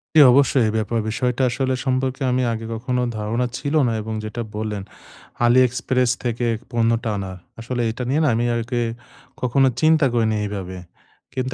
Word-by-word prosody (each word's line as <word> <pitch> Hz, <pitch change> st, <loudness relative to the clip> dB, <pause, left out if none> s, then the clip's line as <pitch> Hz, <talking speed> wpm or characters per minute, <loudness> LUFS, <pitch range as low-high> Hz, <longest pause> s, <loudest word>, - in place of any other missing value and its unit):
জি, -, -, +8 dB
অবশ্যই, 135 Hz, -1 st, +4 dB
এই -, -, -3 dB
ব্যাপার, 115 Hz, +1 st, -1 dB
বিষয়টা 125 Hz, +3 st, -1 dB
আসলে 130 Hz, +2 st, -1 dB
সম্পর্কে 130 Hz, 0 st, -1 dB
আমি 125 Hz, +1 st, +1 dB
আগে 115 Hz, 0 st, -4 dB
কখনো 125 Hz, +2 st, -1 dB, 0.2 s
ধারণা 110 Hz, +4 st, -1 dB
ছিল 145 Hz, 0 st, -3 dB
না -, -, +1 dB
এবং 110 Hz, +1 st, -5 dB
যেটা 115 Hz, +3 st, -5 dB
বললেন, 105 Hz, -2 st, -3 dB, 0.6 s
AliExpress 125 Hz, 0 st, +3 dB
থেকে 120 Hz, 0 st, -1 dB, 0.2 s
পণ্যটা 115 Hz, 0 st, +1 dB
আনা, 95 Hz, -1 st, -4 dB, 0.3 s
আসলে 120 Hz, +1 st, -3 dB
এটা 125 Hz, +3 st, -5 dB
নিয়ে 145 Hz, +4 st, +2 dB
না -, -, +3 dB
আমি 120 Hz, +1 st, 0 dB
আগে 120 Hz, +1 st, -1 dB, 0.6 s
কখনো 130 Hz, +2 st, +3 dB
চিন্তা 155 Hz, -1 st, +4 dB
করি 115 Hz, -2 st, +2 dB
নাই 110 Hz, -, 0 dB
এইভাবে। 95 Hz, -3 st, -5 dB, 0.6 s
কিন্তু 130 Hz, 0 st, -2 dB
120 Hz, 165 wpm, -22 LUFS, 110-130 Hz, 0.6 s, জি